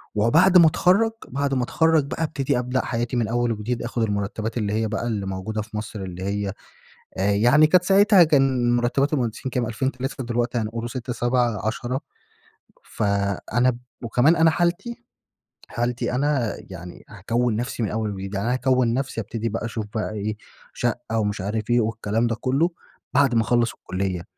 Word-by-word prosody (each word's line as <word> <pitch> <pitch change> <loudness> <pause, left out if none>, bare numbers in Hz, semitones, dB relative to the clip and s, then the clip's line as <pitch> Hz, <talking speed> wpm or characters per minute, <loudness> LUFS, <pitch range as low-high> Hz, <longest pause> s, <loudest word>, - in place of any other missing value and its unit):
وبعد 165 - +5
ما 170 -2 +8
اتخرج، 190 +8 +3 0.2
بعد 140 +1 -1
ما 130 - +1
اتخرج 160 +3 +2
بقى، 155 +3 -3
ابتدى 140 -4 0
ابدأ 125 +1 -1
حياتي 120 +1 -2
من 115 -3 +1
أول 120 +1 0
وجديد، 115 +2 -3
أخُد 120 -1 -2
المرتبات 105 +2 -2
اللي 105 -3 -1
هي 110 0 0
بقى 115 +2 -3
اللي 105 -4 -2
موجودة 95 +3 -3
في 105 0 -7
مصر، 110 -1 -6
اللي 90 0 -7
هي 100 0 -2 0.7
آآ 100 +2 +2
يعني 120 +9 +5
كانت 180 +3 +4
ساعتها 195 0 +6
كان 130 -5 +2
مرتبات 135 +4 +1
المهندسين 125 -2 -2
كام 125 -1 -1
2000، 125 +4 -1
3، 130 0 -5
دلوقتي 120 +1 -1
هنقول 115 +2 -3
6، 125 0 -4
7، 120 -3 0
10. 120 +4 -2 1.0
فأنا 105 +4 0 0.3
وكمان 125 +8 +3
أنا 160 0 +5
حالتي، 175 +8 -1 0.6
حالتي 120 +1 -2
أنا 135 -4 0
يعني، 90 -2 -10
هاكون 115 +4 -1
نفسي 120 0 -3
من 105 - -1
أول 110 -1 -2
وجديد، 95 0 -6
يعني 100 +3 -2
أنا 120 - +2
هاكون 130 -2 +2
نفسي. 130 -2 -2
هابتدي 115 +2 -4
بقى 115 +1 -3
أشوف 110 -1 -4
بقى 110 0 -2
إيه، 105 0 -3 0.4
شقة 115 0 -2
ومش 105 -2 -1
عارف 110 +3 -3
إيه 120 0 +4
والكلام 110 +1 -1
ده 115 - -1
كله، 135 +8 +1 0.4
بعد 135 -2 +3
ما 115 - +4
اخلص 120 0 +2
الكلية، 95 -2 -3
120 Hz, 175 wpm, -23 LUFS, 110-130 Hz, 1.0 s, ما